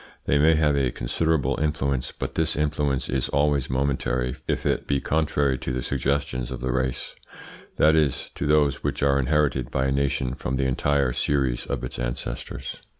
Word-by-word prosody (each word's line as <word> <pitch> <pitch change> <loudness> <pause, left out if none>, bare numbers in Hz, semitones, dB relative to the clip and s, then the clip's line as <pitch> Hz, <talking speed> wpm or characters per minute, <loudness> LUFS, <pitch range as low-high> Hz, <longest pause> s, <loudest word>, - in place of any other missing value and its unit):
They 70 - +2
may 80 +2 +5
have 75 -2 +3
a 70 -3 +2
considerable 80 +5 0
influence, 70 -4 0
but - - -5
this 80 -1 0
influence 75 -2 0
is 65 0 -1
always 70 -1 +1
momentary 65 -2 0
if - - -1
it - - 0
be 70 -1 +1
contrary 70 -3 +1
to 65 - -3
the 65 0 -2
suggestions 70 -2 -1
of 65 -1 -5
the 65 0 -2
race; 65 -1 -2 0.6
that 80 +1 +5
is, 75 -4 +1
to - - -3
those 75 -2 +2
which - - -1
are 70 -1 +3
inherited 70 -2 +1
by 65 0 0
a 65 - +1
nation 65 -2 0
from 65 0 -3
the 65 - 0
entire 70 0 +1
series 65 -4 0
of - - -3
its 60 - -5
ancestors. - - -5
70 Hz, 180 wpm, -25 LUFS, 65-75 Hz, 0.6 s, may